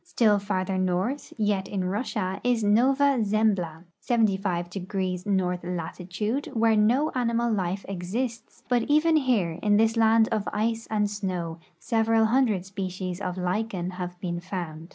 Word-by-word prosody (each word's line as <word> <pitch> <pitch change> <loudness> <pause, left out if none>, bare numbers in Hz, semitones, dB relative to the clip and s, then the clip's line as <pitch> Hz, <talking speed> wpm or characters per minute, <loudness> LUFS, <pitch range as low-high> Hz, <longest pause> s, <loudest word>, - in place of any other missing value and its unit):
Still 210 -3 +3
farther 190 -2 -1
north, 185 +10 -1
yet 205 -3 0
in 195 -2 -2
Russia, 190 -1 -2
is 245 -3 +1
Nova 265 +6 +3
Zembla, 200 -6 0 0.2
75° 190 -3 -1
north 180 -3 0
latitude, 180 - -3
where 225 -1 +3
no 240 +9 +3
animal 235 -2 +1
life 190 -1 -2
exists; 220 +6 -4
but 245 -1 +2
even 310 +2 +4
here, 220 - +1
in 205 -1 +3
this 225 +1 +3
land 225 0 +4
of 215 -2 -1
ice 225 +2 -1
and 210 -1 +1
snow, 185 -5 -4 0.2
several 225 0 +2
hundred 220 -6 +2
species 185 -1 -5
of 180 -2 -3
lichen 185 0 -2
have 180 -1 -6
l)een 175 -2 -3
found. 170 -3 -6
205 Hz, 140 wpm, -26 LUFS, 180-225 Hz, 0.2 s, even